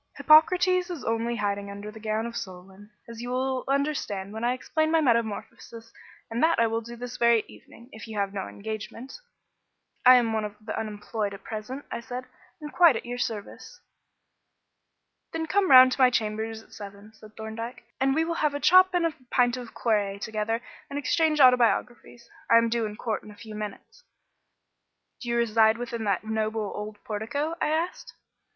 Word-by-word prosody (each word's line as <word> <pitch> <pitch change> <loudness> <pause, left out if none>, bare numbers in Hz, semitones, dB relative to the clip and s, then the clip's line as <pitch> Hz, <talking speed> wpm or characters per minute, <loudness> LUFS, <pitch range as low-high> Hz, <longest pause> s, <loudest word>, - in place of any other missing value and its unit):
Hippocrates 360 +4 +5
is 345 -6 -6
only 230 +1 -1
hiding 200 -2 -2
under 200 +1 -7
the 220 - -12
gown 215 +1 -2
of 235 0 -6
Solon, 190 +1 -9 0.2
as 230 0 -9
you 245 - -5
will 260 +1 -1
understand 270 -9 -1
when 220 +1 -6
I 240 +1 +2
explain 315 +5 -1
my 325 0 +3
metamorphosis; 230 -2 -2 0.4
and 230 - -2
that 330 +1 +3
I 230 - +5
will 225 0 -1
do 235 +1 -9
this 245 0 -7
very 235 -1 +4
evening, 235 - -16
if 220 0 -10
you 220 -1 -7
have 200 -1 -1
no 195 -2 -4
engagement." 220 - -7 0.8
"I 255 0 +9
am 235 -3 +2
one 220 -1 0
of 210 -1 -5
the 215 0 -6
unemployed 210 -1 -4
at - - -14
present," 225 +6 -6
I - - -3
said, 250 +1 -7 0.3
"and 300 -1 -8
quite 340 -7 +6
at - - -5
your 245 +1 -5
service." 230 - -5 1.5
"Then 325 0 -2
come 385 +4 +1
round 255 -1 +9
to 265 - -1
my 255 - +7
chambers 220 -1 -2
at - - -21
seven," 205 +1 -11
said 215 -1 -17
Thorndyke, 225 +3 -7 0.2
"and 270 +1 +2
we 320 +1 +2
will 335 - -2
have 300 -2 +1
a - - -2
chop 370 +4 +6
and 350 -1 +2
a 330 - 0 0.2
pint 245 -1 +2
of 245 -2 -9
claret 205 -3 0
together 220 +2 -2 0.3
and 280 - -5
exchange 310 +1 +1
autobiographies. 245 -2 +3 0.2
I 230 - +7
am 230 0 +3
due 230 -1 0
in 210 - -8
court 220 0 -3
in - - -14
a 210 - -12
few 215 +1 -11
minutes." 210 - -8 1.2
"Do 240 - -5
you 235 - +1
reside 225 -1 +3
within 235 -2 -4
that 200 0 0
noble 220 -1 -2
old 210 0 -6
portico?" 235 +9 -3
I - - +2
asked. 325 +3 -2
230 Hz, 190 wpm, -26 LUFS, 215-260 Hz, 1.5 s, I